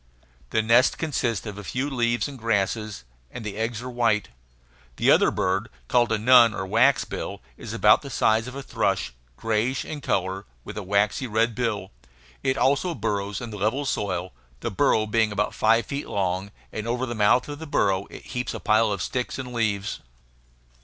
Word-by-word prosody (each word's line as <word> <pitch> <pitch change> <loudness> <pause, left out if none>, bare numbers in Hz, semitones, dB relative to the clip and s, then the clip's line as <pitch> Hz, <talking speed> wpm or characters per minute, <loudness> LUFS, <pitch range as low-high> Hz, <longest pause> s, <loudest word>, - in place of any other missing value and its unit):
The 110 - +1
nest 120 +4 +4
consists 125 -9 -1
of 105 -1 -6
a - - -8
few 130 +8 -2
leaves 120 -3 0
and 140 -3 -9
grasses, 105 - -1 0.3
and 110 - -8
the 105 -2 -4
eggs 115 +2 -3
are 125 - -5
white. 115 -4 +1 0.7
The - - +3
other - - +5
bird, 95 +5 -1 0.2
called 120 -2 +3
a 110 - +3
nun 115 0 +6
or 95 - -3
waxbill, 115 +8 +1 0.2
is - - -8
about - - +5
the - - -8
size 110 +2 +2
of 130 - -8
a 140 - -6
thrush, - - -1 0.2
grayish 115 +4 0
in 150 -2 -6
color, 95 -4 -1 0.2
with - - -8
a 105 - -4
waxy 100 +7 +1
red 115 +1 +1
bill. 110 -5 -2 0.5
It 130 0 0
also 145 +6 +2
burrows 105 -3 -2
in 120 -2 -6
the 105 - -6
level 110 +8 0
soil, 95 -7 -2 0.3
the - - -2
burrow 110 - +2
being 110 -1 +1 0.2
five 115 +1 +3
feet 140 +1 -4
long; 95 0 -1 0.2
and 110 +1 -4
over 125 +2 -1
the 120 - -4
mouth 110 +3 +3
of 145 0 -6
the 160 - -7
burrow 100 -8 +1
it - - -11
heaps 125 -2 -4
a - - -5
pile 110 0 +3
of 100 -3 -2
sticks 125 -1 -3
and 125 -2 -6
leaves. 105 -4 -1
115 Hz, 185 wpm, -25 LUFS, 105-125 Hz, 0.7 s, nun